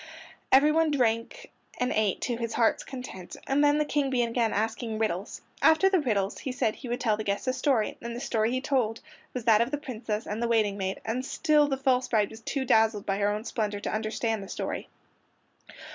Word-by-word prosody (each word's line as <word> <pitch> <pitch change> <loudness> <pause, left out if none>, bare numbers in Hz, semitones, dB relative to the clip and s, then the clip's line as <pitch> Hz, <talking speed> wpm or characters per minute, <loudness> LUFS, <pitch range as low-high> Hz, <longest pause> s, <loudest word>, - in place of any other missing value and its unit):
Everyone 300 +4 +5
ate 255 - -1 0.3
and 250 0 0
drank 215 -3 +1
to 245 - -1
his 230 -1 -3
heart's 230 -2 +2
content, 250 -9 -8
and 280 +2 +2
then 290 0 +4
the 300 - +1
King 290 -2 0
began 235 -3 +1
asking 225 +1 -2
riddles. 210 -3 -2 0.2
After 320 +5 +5
the 375 - +4
riddles 210 -8 -1
he 265 - -4
said 225 -3 0
he 255 - -8
would 240 - -2
tell 220 -4 +1
the 215 - -3
guests 200 +3 -2
a 255 - +2
story, 255 -5 0
and 235 0 -5
the - - -4
story 225 -3 0
he 255 +1 -1
told 250 -5 0 0.3
was 245 -3 -4
that 225 -2 +5
of 235 - +1
the 290 - -2
Princess 230 -6 -4
and 210 +2 -4
the 235 - +1
waiting 215 -3 +2
maid, 190 -1 -3
and 235 +4 -2
still 300 +2 +2
the 270 -2 -1
false 260 -1 +1
bride 210 -3 +1
was 220 +1 -11
too 265 +3 -2
dazzled 220 -3 +3
by 195 -1 0
her 205 0 +2
own 210 +1 -2
splendor 210 -3 -2
to - - -4
understand 220 0 -1
the 195 - -9
story. - - -4
235 Hz, 215 wpm, -28 LUFS, 215-265 Hz, 0.3 s, Everyone